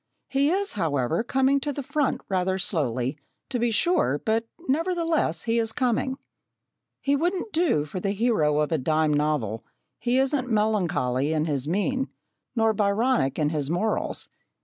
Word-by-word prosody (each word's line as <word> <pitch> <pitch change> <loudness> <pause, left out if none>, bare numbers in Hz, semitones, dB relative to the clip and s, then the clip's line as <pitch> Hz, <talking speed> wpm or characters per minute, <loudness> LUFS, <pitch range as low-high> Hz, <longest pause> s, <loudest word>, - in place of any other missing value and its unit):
He 275 +2 +2
is, 395 +3 0
however, 155 - 0
coming 265 +3 +2
to 290 +1 -2
the 280 0 -5
front 290 +1 0
rather 190 0 0
slowly, 140 - -1 0.3
to 255 -2 -1
be 240 +1 +2
sure, 225 - +2
but 225 +1 +1 0.2
nevertheless 330 - 0
he 235 0 +1
is 225 -1 +1
coming. 255 +2 0 0.8
He 280 0 +2
wouldn't 355 +7 -1
do 315 - +2
for 155 +5 -5
the 195 - -1
hero 195 -9 +2
of 150 - -1
a 160 - +1
dime 155 +2 +2
novel 145 -8 0 0.4
he 245 +1 +1
isn't 265 -1 +1
melancholy 175 - +1
in 155 -1 +1
his 145 -3 -1
mien, 260 - 0 0.5
nor 225 -1 +3
Byronic 205 - +1
in 150 -2 +1
his 150 -3 -2
morals. 210 +6 -1
215 Hz, 155 wpm, -25 LUFS, -, 0.8 s, nor